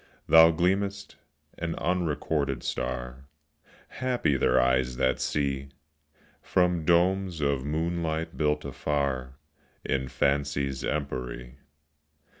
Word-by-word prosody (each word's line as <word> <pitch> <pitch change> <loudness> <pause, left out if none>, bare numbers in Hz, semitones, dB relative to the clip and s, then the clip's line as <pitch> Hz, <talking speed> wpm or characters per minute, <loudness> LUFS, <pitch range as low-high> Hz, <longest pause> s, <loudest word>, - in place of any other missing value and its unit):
Thou 80 0 +8
gleam'st, 100 +4 -1 0.4
an 85 0 -2
unrecorded 75 -6 -1
star, 60 +1 -4 0.6
(Happy 125 - 0
their 65 - +3
eyes 65 0 +1
that 65 -1 +1
see!) 70 -2 -1 0.7
From 90 -3 +1
domes 90 +1 +2
of 70 -3 0
moonlight 80 +1 -2
built 75 -1 0
afar 70 -3 -2 0.5
In 65 0 -1
Fancy's 70 +1 0
empery. 65 -3 -4
75 Hz, 90 wpm, -27 LUFS, 65-85 Hz, 0.7 s, Thou